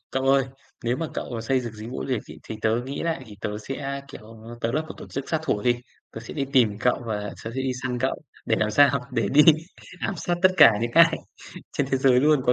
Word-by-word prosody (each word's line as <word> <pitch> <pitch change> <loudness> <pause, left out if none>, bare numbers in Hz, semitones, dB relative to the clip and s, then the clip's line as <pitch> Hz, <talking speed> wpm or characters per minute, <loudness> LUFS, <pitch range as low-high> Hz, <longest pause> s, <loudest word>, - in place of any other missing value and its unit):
Cậu 135 - -1
ơi, 135 0 +4 0.4
nếu 120 +2 +1
mà 165 - -2
cậu, - - -3
ờ, 115 -2 -5
xây 130 +3 +1
dựng 120 -3 -6
dịch 110 +1 -9
vụ 130 - -5
du - - -8
lịch 120 -5 0
ấy, - - -10
thì 110 - -7
tớ 115 +2 +1
nghĩ 140 +1 -4
lại 165 -5 -2
thì 105 - -12
tớ 105 0 -3
sẽ, 140 +4 -5
kiểu, 110 -2 -12 0.2
tớ 115 - -1
lập 155 +4 0
một - - -7
tổ - - -10
chức 135 0 -5
sát 160 - +1
thủ 105 -9 -1
đi, 120 -1 +3 0.4
tớ 110 - -7
sẽ 115 - -9
đi 140 - -1
tìm 110 -6 +3
cậu 125 0 +1
và 105 -2 -2 0.2
tớ 110 - -4
sẽ 130 - -2
đi 130 - -1
săn 125 -1 -2
cậu, 130 +3 -2 0.2
để 110 - +2
làm 110 0 +1
sao? 140 +1 +4
Để 115 -5 0
đi 150 +2 +7 0.6
ám 195 - -2
sát 175 +2 -1
tất 185 - +8
cả 150 -7 +9
những 120 0 -1
ai 165 0 +6 0.6
trên 145 - 0
thế 135 - +3
giới 130 -1 +4
luôn 150 -1 +4
có 125 - +5
130 Hz, 270 wpm, -25 LUFS, 115-140 Hz, 0.6 s, cả